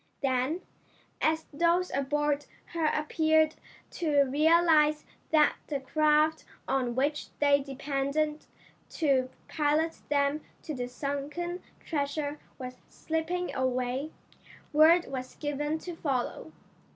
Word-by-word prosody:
Then, 265 +6 +1 0.6
as 315 0 +1
those 340 +4 +2
aboard 290 +1 0 0.3
her 330 -2 +1
appeared 315 +1 +2 0.4
to 295 -4 +2
realize 305 +1 +4 0.2
that 305 -1 +4
the 285 -2 -2
craft 305 +3 +2 0.2
on 255 -3 0
which 290 +3 0
they 285 -1 +4
depended 280 +2 -2 0.4
to 270 -5 +1 0.2
pilot 310 +2 +1
them 285 +1 +1 0.2
to 310 - -4
the 250 -3 -3
sunken 285 +7 -4 0.2
treasure 290 -1 -2 0.2
was 255 -1 -7
slipping 325 +3 -2
away, 255 +2 -1 0.6
word 325 +3 +6
was 255 -1 -6
given 295 +1 -2
to 345 +1 -7
follow. 270 -6 -2
295 Hz, 105 wpm, -29 LUFS, 275-315 Hz, 0.6 s, word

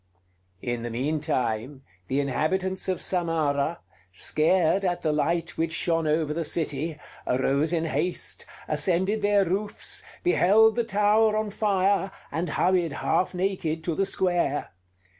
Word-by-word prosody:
In 120 -1 -2
the 120 - -4
mean 135 +7 -1
time, 130 -1 -2 0.2
the 135 - 0
inhabitants 185 +8 -1
of 185 - 0
Samarah, 165 -3 0 0.3
scared 165 - +2
at 175 -2 -1
the 155 -2 +1
light 165 +2 -1
which 165 0 0
shone 165 0 +1
over 155 0 +1
the 165 +1 -2
city, 155 -1 -1 0.3
arose 135 +5 +1
in 165 -1 0
haste, 160 +3 -2 0.2
ascended 185 +7 0
their 205 -1 +3
roofs, 200 +4 -1 0.2
beheld 220 - +5
the 235 - +1
tower 215 0 +3
on 215 -1 -2
fire, 200 -2 +1 0.2
and 165 +1 -2
hurried 175 -2 +1
half 180 +5 0
naked 180 -4 -1
to 170 - -1
the 195 +4 0
square. 175 -7 0
170 Hz, 140 wpm, -26 LUFS, 150-190 Hz, 0.3 s, beheld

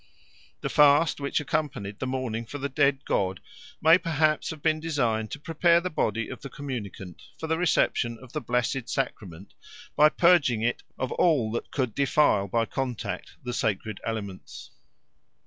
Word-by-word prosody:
The - - -2
fast 145 +2 +5
which 140 -1 -1
accompanied 135 -9 -3
the 130 - -3
mourning 125 -3 -3
for 145 - -6
the 140 0 -2
dead 140 0 +1
god 95 -1 0 0.4
may 165 +3 +7
perhaps 155 -3 +1
have 155 -2 -7
been 155 -1 +2
designed 120 -9 -1
to 145 - -6
prepare 170 +2 +3
the 180 +1 -4
body 115 -5 -1
of - - -8
the 140 - -7
communicant 105 - -7 0.2
for 160 - -5
the 160 +1 0
reception 120 -8 +1
of 130 -2 -15
the 155 - -2
blessed 125 +1 -1
sacrament 100 - -4 0.4
by 150 +1 +6
purging 150 -10 +3
it 120 +1 0 0.2
of 130 - -3
all 140 -11 +2
that 115 - -4
could 125 -6 -2
defile 140 -7 +2
by 115 +4 +1
contact 125 -1 -4
the 125 0 -4
sacred 110 -4 -2
elements. 100 -4 -6
130 Hz, 165 wpm, -27 LUFS, 115-150 Hz, 0.4 s, may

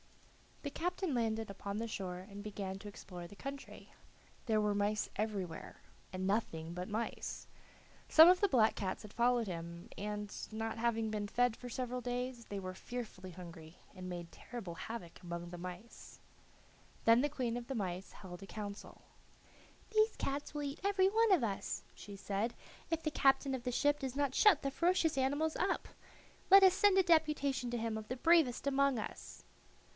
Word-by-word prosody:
The 285 - -3
captain 355 0 -1
landed 225 -3 0
upon 200 +1 -5
the 230 +1 -2
shore 185 -4 -4
and 200 -1 -8
began 195 -2 -5
to 205 - -9
explore 180 -3 -8
the 205 - -13
country. 275 +5 -8 0.5
There 215 -2 +3
were 210 -1 +2
mice 205 +1 0
everywhere, 195 -5 -3 0.3
and 185 0 -3
nothing 170 -6 -1
but 180 +1 -4
mice. 220 +2 -3 0.6
Some 320 +1 +10
of 365 0 +6
the 405 - +5
black 235 - +4
cats 190 -2 -3
had 210 - -11
followed 240 -1 +2
him, 170 -1 -6
and, 210 0 -4 0.2
not 225 +1 -3
having 225 -2 +1
been 210 -1 -2
fed 245 +2 +2
for 245 - -8
several 250 0 -3
days, 245 -1 -3
they 200 - -5
were 185 -1 -5
fearfully 190 -3 -7
hungry, 170 -2 -11 0.2
and 185 -1 -7
made 175 -1 -6
terrible 230 -8 -7
havoc 185 0 -7
among 170 0 -5
the 175 - -7
mice. 180 +6 -9 0.9
Then 230 +2 +7
the 295 - +1
queen 250 -5 -2
of 240 -1 -5
the 270 - -3
mice 190 -3 -3
held 180 -2 -10
a 195 - -9
council. 205 -1 -7 0.9
"These 435 0 +3
cats 280 +2 -3
will 295 -1 -3
eat 280 0 -4
every 390 -1 +4
one 450 +1 +3
of 360 -10 +5
us," 200 -4 -2
she 205 - -10
said, 200 +3 -2 0.3
"if 325 -1 -1
the 310 - 0
captain 270 -1 +3
of 255 -2 -3
the 250 - -1
ship 290 +4 +2
does 265 -2 -4
not 285 -2 +1
shut 420 +6 +6
the 275 - 0
ferocious 335 -2 +2
animals 290 +4 +1
up. 380 0 0 0.6
Let 390 0 +10
us 375 -1 +8
send 405 0 +4
a 380 - +6
deputation 300 -7 +2
to 240 - -1
him 225 -1 -2
of 215 - -10
the 255 - -3
bravest 320 -5 +4
among 275 -1 +3
us." - - -7
230 Hz, 180 wpm, -35 LUFS, 195-275 Hz, 0.9 s, Some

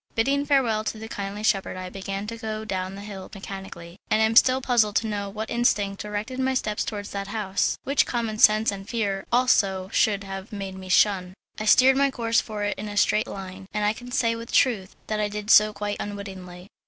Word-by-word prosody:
Bidding 280 +5 +1
farewell 245 -7 +2
to 220 - -3
the 220 +1 -7
kindly 205 -1 -5
shepherd 195 -3 +1
I 185 0 -5
began 195 +1 -5
to 230 +2 -5
go 220 -1 -5
down 190 -2 -3
the 200 - -8
hill 195 -2 -8
mechanically, 190 -2 -9
and 215 - +3
I 220 - +5
am 220 +1 0
still 255 +2 +6
puzzled 235 -5 +2
to 225 - +1
know 205 -2 -3
what 215 +2 -6
instinct 205 -4 +1
directed 210 +5 -4
my 260 0 +1
steps 210 -4 -1
towards 205 -1 -5
that 200 0 -4
house, 200 -2 -1
which 280 +1 +2
common 230 -3 -2
sense 215 +1 +5
and 195 0 -8
fear 200 -5 -2
also 200 -7 +2
should 200 -2 +2
have 195 +1 -7
made 195 -2 -5
me 190 0 -9
shun. 185 -2 +3 0.2
I 215 - -3
steered 260 +4 +6
my 280 0 +3
course 230 -3 +1
for 210 -2 -5
it 205 - -2
in 210 - -5
a 205 0 -6
straight 210 +2 +3
line, 190 0 -8
and 210 0 +1
I 210 - +2
can 245 +2 -11
say 230 -2 +1
with 230 0 -8
truth 210 -8 +2
that 215 -1 -2
I 210 - +1
did 210 0 -3
so 215 0 +7
quite 205 0 -4
unwittingly. 190 -3 -8
210 Hz, 220 wpm, -25 LUFS, 195-225 Hz, 0.2 s, so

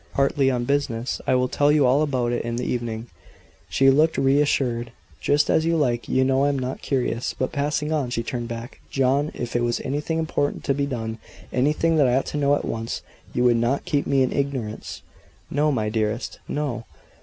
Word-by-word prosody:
"Partly 135 0 +3
on 125 -2 0
business. 130 -3 -1
I - - +4
will 125 0 +2
tell 145 +3 +2
you 150 -2 +4
all 130 +4 +4
about 130 -5 0
it 120 - 0
this 120 +1 -2
evening." 120 -2 -3 0.6
She 135 +10 +5
looked 155 +4 +3
re 135 +2 +4
assured. 120 -5 0 0.3
"Just 145 +1 +2
as 160 - +3
you 165 0 +2
like; 120 -7 0
you 130 - +3
know 135 +1 +2
I - - +3
am 140 - 0
not 130 0 -4
curious." 125 -3 -1
But 130 - -1
passing 150 +1 -1
on, 145 -5 0
she 115 -1 -2
turned 120 0 -4
back. 115 +1 -7
"John, 135 +2 +2
if 120 -1 -5
it 120 - +2
was 120 0 0
anything 150 +4 -2
important 160 -3 -1
to 140 - +1
be 140 +1 -1
done 115 -4 -4 0.3
anything 155 +5 +2
that 145 -4 +5
I 125 - +3
ought 135 - +1
to - - -1
know 145 0 +3
at - - -3
once, 115 0 -4 0.3
you 125 - 0
would 120 -1 +5
not 120 +4 0
keep 145 -2 0
me 135 -1 +3
in 130 - -1
ignorance?" 135 -6 -3 0.5
"No 150 +2 +2
my 110 -6 0
dearest! 110 +2 -2
No!" 135 -6 -3
130 Hz, 210 wpm, -24 LUFS, 120-145 Hz, 0.6 s, She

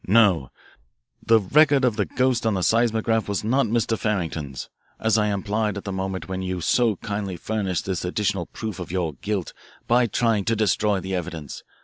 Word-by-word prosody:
"No, 95 - +4 0.7
the 115 -1 +5
record 140 +6 +4
of 120 -4 +1
the - - 0
ghost 130 -2 +1
on 110 - +1
the 95 - -1
seismograph 115 -1 +2
was 100 +1 -1
not 125 +3 +2
Mr. 115 0 +1
Farrington's, 80 -11 -3 0.3
as 110 0 +2
I 105 -1 +3
implied 105 +1 -1
at 100 - -6
the 100 - -4
moment 95 -2 -3
when 95 0 -3
you 95 -1 -3
so 115 +5 +2
kindly 100 -2 -4
furnished 95 -2 -2
this 95 -3 -2
additional 95 -1 -1
proof 110 -4 -6
of 90 - -6
your 85 -4 -1
guilt 100 +6 -3 0.3
by 120 0 +3
trying 110 -1 +1
to 115 - +1
destroy 105 -1 +1
the 95 +1 -5
evidence. 85 -5 -5
105 Hz, 185 wpm, -24 LUFS, 95-115 Hz, 0.7 s, the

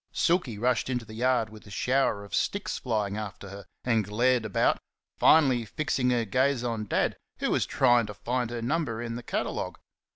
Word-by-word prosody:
Silky 170 - +1
rushed 125 +3 +1
into 125 -3 -2
the 110 - -11
yard 120 -1 +1
with 110 -1 -13
a - - -11
shower 125 -1 +1
of 100 - -13
sticks 200 0 -1
flying 105 -4 -1
after 100 -2 -6
her 100 0 -9 0.2
and 115 -3 +2
glared 120 +4 +1
about, 105 - +2 0.4
finally 135 -7 +5
fixing 130 +2 -1
her 120 -2 +1
gaze 130 +3 +1
on 115 -3 -2
Dad, 100 - 0 0.2
who - - -1
was - - +1
trying 120 -2 +3
to 105 - -7
find 125 +1 -2
her 120 -1 -4
number 125 -4 -1
in 120 -1 -4
the 120 - -5
catalogue. - - -3
120 Hz, 190 wpm, -28 LUFS, 110-130 Hz, 0.4 s, finally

